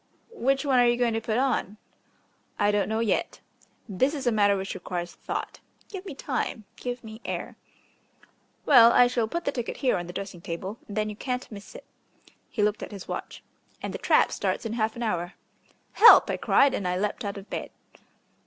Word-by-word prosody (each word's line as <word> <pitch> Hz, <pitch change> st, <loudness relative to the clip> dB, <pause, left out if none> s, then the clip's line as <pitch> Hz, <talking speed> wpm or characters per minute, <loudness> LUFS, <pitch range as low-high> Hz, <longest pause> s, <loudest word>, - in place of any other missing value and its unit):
"Which 270 Hz, -, 0 dB
one 265 Hz, -3 st, +3 dB
are 245 Hz, -, +5 dB
you 240 Hz, 0 st, +2 dB
going 240 Hz, -2 st, +1 dB
to 225 Hz, -, -1 dB
put 220 Hz, 0 st, -1 dB
on?" 250 Hz, -6 st, 0 dB, 0.8 s
"I 205 Hz, -, +3 dB
don't 205 Hz, 0 st, 0 dB
know 220 Hz, +1 st, 0 dB
yet. 230 Hz, -, -1 dB, 0.5 s
This 260 Hz, +9 st, 0 dB
is 280 Hz, -2 st, -5 dB
a 240 Hz, -, +3 dB
matter 205 Hz, -2 st, +3 dB
which 190 Hz, 0 st, -4 dB
requires 175 Hz, 0 st, -5 dB
thought. -, -, -5 dB, 0.3 s
Give 380 Hz, -3 st, -7 dB
me 310 Hz, -, -7 dB
time, 250 Hz, -6 st, -3 dB
give 245 Hz, -1 st, -5 dB
me 220 Hz, +1 st, -10 dB
air." -, -, -5 dB, 1.1 s
"Well, 235 Hz, -5 st, +8 dB
I 245 Hz, -, +7 dB
shall 245 Hz, -2 st, 0 dB
put 340 Hz, +8 st, -4 dB
the -, -, +1 dB
ticket 240 Hz, -4 st, -4 dB
here 260 Hz, -3 st, +1 dB
on 175 Hz, -1 st, -5 dB
the 175 Hz, -, -8 dB
dressing 195 Hz, -3 st, -6 dB
table, 185 Hz, +6 st, -6 dB
and 205 Hz, -, -7 dB
then 215 Hz, 0 st, 0 dB
you -, -, -8 dB
can't 250 Hz, +2 st, -4 dB
miss 200 Hz, -1 st, -11 dB
it." -, -, -11 dB, 0.6 s
He 210 Hz, -, -1 dB
looked 210 Hz, 0 st, +1 dB
at -, -, -7 dB
his 200 Hz, -3 st, -9 dB
watch. -, -, -6 dB, 0.4 s
"And -, -, -4 dB
the -, -, -5 dB
trap -, -, +3 dB
starts -, -, -2 dB
in 225 Hz, -, -3 dB
half 220 Hz, -1 st, -1 dB
an 240 Hz, -, -4 dB
hour." 175 Hz, -5 st, -2 dB, 0.6 s
"Help!" 460 Hz, -, +8 dB
I -, -, -2 dB
cried, 275 Hz, -1 st, +3 dB
and 195 Hz, -, -2 dB
I 180 Hz, 0 st, 0 dB
leapt 205 Hz, +2 st, -2 dB
out 200 Hz, -1 st, -4 dB
of 200 Hz, +1 st, -10 dB
bed. -, -, -4 dB
220 Hz, 210 wpm, -26 LUFS, 200-250 Hz, 1.1 s, Well